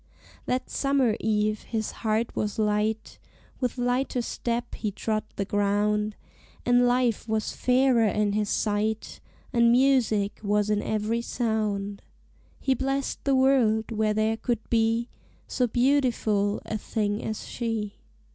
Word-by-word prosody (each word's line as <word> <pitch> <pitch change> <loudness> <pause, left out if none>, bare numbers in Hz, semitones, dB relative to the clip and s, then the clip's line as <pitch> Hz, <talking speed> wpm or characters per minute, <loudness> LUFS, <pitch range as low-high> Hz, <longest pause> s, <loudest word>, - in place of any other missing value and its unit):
That 255 +1 -1
summer 275 -5 +1
eve 215 -1 0
his 220 -2 -3
heart 220 +1 0
was 210 -1 -2
light: 215 +1 -1 0.4
With 250 -1 -2
lighter 245 0 0
step 235 +1 -3
he 215 - -2
trod 215 +2 -2
the 200 - -2
ground: 205 +1 +1 0.5
And 245 0 +4
life 245 -3 +1
was 220 -1 -1
fairer 250 -3 +3
in 210 0 +1
his 210 0 0
sight, 215 +1 -1 0.3
And 235 -1 +5
music 240 -6 +2
was 210 0 +1
in 210 0 +1
every 220 +2 -1
sound: 210 -4 -2 0.6
He 265 - +1
blessed 270 +2 -2
the 275 -1 +3
world 245 -5 +3
where 215 -1 +1
there 220 +1 +1
could 230 -1 -2
be 230 0 +2 0.4
So 250 -2 0
beautiful 240 -5 +1
a 215 - -3
thing 210 0 -2
as 220 - -4
she. 225 -4 -3
220 Hz, 135 wpm, -26 LUFS, 210-245 Hz, 0.6 s, And